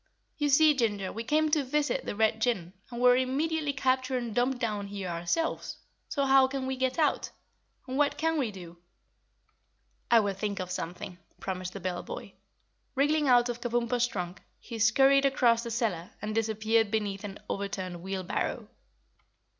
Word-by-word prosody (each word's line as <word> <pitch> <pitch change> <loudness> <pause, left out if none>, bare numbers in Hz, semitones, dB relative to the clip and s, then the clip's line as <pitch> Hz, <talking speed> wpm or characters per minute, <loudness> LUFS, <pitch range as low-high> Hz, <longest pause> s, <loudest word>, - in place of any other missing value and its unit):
"You 295 -2 0
see, 305 +2 +6
Ginger, 205 -7 -1
we 225 - -4
came 310 +5 +2
to 300 -1 +3
visit 300 - 0
the - - -3
Red 220 +1 +2
Jinn 190 -8 0 0.2
and 240 -1 -6
were 245 0 +6
immediately 290 +4 0
captured 260 -1 0
and 240 -3 -4
dumped 245 +3 +1
down 210 -5 -2
here 200 -2 -5
ourselves. 175 - -2 0.3
So 280 -2 0
how 270 -1 +6
can 265 0 -4
we 265 0 -2
get 260 0 -1
out? 310 -3 +1 0.6
And 260 +2 -3
what 290 -1 +2
can 325 0 +1
we 255 -5 0
do?" 175 -4 -10 1.3
"I 235 - +7
will 200 -1 -1
think 200 +1 -3
of 180 -1 -4
something," 180 +1 -5 0.2
promised 185 -1 -4
the 200 - -6
bell 180 -1 -3
boy. - - -8 0.6
Wriggling 295 +2 +2
out 245 -1 +5
of 240 -1 -4
Kabumpo's 240 0 +1
trunk, 180 -5 -5 0.2
he 230 -2 -8
scurried 270 +6 +5
across 240 -4 +3
the 235 - -5
cellar 215 -7 -1
and 210 +1 -4
disappeared 220 0 +1
beneath 205 -2 -2
an 200 -1 -6
overturned 185 -3 -4
wheelbarrow. 190 0 -3
235 Hz, 170 wpm, -29 LUFS, 200-270 Hz, 1.3 s, I